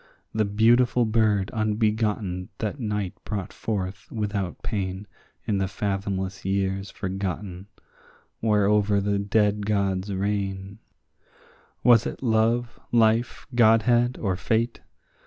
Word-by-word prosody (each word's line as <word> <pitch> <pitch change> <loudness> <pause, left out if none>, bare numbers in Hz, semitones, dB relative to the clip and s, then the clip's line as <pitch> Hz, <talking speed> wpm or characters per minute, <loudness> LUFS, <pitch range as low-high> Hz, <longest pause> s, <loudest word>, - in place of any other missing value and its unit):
The 110 -1 +1
beautiful 120 +4 +3
bird 105 -3 +2
unbegotten 105 -4 0
that 110 +6 -3
night 105 -5 -2
brought 100 -3 -4
forth 100 -3 -4
without 100 -5 -3
pain 95 -1 -3 0.4
In 100 -2 0
the 95 - 0
fathomless 95 -1 -3
years 95 0 -1
forgotten 95 -1 -4 0.7
whereover 105 -1 +3
the 100 0 0
dead 105 0 +1
gods 100 -2 0
reign, 100 0 -2 1.0
Was 120 -2 +6
it - - -7
love, 115 +1 +1
life, 115 +1 +2
godhead, 120 +1 +4
or 95 -4 0
fate? 115 +5 -1
105 Hz, 105 wpm, -25 LUFS, 95-110 Hz, 1.0 s, Was